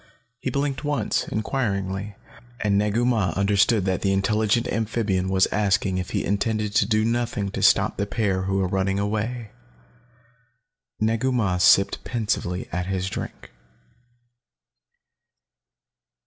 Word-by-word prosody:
He 130 - -3
blinked 140 +2 -2
once, 145 -1 -1
inquiringly, 100 -4 -2 0.4
and 105 -1 +1
Negu 105 +4 +1
Mah 110 -7 +1
understood 100 +1 +2
that 95 -2 0
the 100 - +1
intelligent 105 +4 +1
amphibian 105 -4 -1
was 95 0 +3
asking 100 -2 +1
if 90 - -5
he - - -2
intended 105 0 -1
to 105 -2 +3
do 110 -1 +2
nothing 115 -4 -1
to - - -4
stop - - +3
the 100 - -1
pair 100 -5 -1
who 95 0 0
were 95 -1 +1
running 95 +1 0
away. 110 +2 -2 1.5
Negu 115 +4 +1
Mah 105 -8 0
sipped 100 +2 +4
pensively 105 -6 -2
at 90 0 -2
his 95 0 -2
drink. - - -7
105 Hz, 130 wpm, -24 LUFS, 95-115 Hz, 1.5 s, sipped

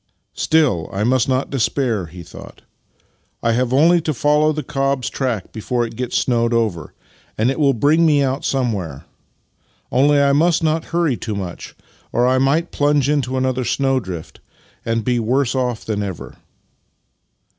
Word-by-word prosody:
" - - -52
Still, 150 - +1
I 100 +2 -2
must 125 +2 +2
not 130 +1 0
despair," 120 -6 0
he 85 +2 -11
thought. - - -13 0.4
" - - -43
I 115 - +2
have 125 +1 0
only 165 +6 +4
to 155 -2 -2
follow 150 +4 +3
the 155 -1 -3
cob's 135 -1 -1
track 120 -8 -3
before 120 +2 -2
it 115 0 -9
gets 125 +1 -2
snowed 120 -1 +1
over, 105 -9 -2 0.4
and 115 +4 +2
it 135 - -4
will 140 -3 +3
bring 150 +8 +3
me 150 -3 +4
out 135 +1 -1
somewhere. 100 - -2 0.9
Only, 145 +3 +4
I 140 0 +3
must 165 +3 +2
not 160 0 0
hurry 165 -7 0
too 110 -3 -4
much, 95 -3 -7 0.4
or 120 - +2
I 130 +1 +3
might 150 +6 +1
plunge 145 -1 +1
into 130 -3 0
another 130 0 0
snowdrift 120 - -2 0.4
and 115 -1 -1
be 125 -1 +1
worse 125 +3 0
off 125 -3 -2
than 105 -2 -2
ever." 95 -4 -6
130 Hz, 165 wpm, -19 LUFS, 115-145 Hz, 0.9 s, only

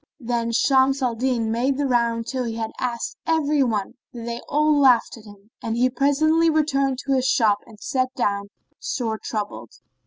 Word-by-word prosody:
Then 235 -2 -2
Shams 265 +3 +3
al 245 -2 +1
Din 235 -2 -1
made 255 +4 0
the 290 - 0
round 235 -3 +1
till 255 0 -3
he 225 -1 -4
had 225 -1 -4
asked 240 -2 -3
every 305 -3 +2
one, 220 -6 -1 0.2
but 235 -2 -8
they 235 0 -4
all 300 +1 +3
laughed 255 -4 +4
at 225 -2 -15
him, 205 +1 -16
and 225 0 -3 0.2
presently 310 +4 +3
he - - +5
returned 275 -4 +1
to 275 - +1
his 260 -1 +1
shop 210 -6 +3
and 220 -2 -15
sat 255 0 -1
down, 200 -4 -1 0.3
sore 225 -4 -3
troubled. 205 - -5
245 Hz, 185 wpm, -23 LUFS, 225-275 Hz, 0.3 s, he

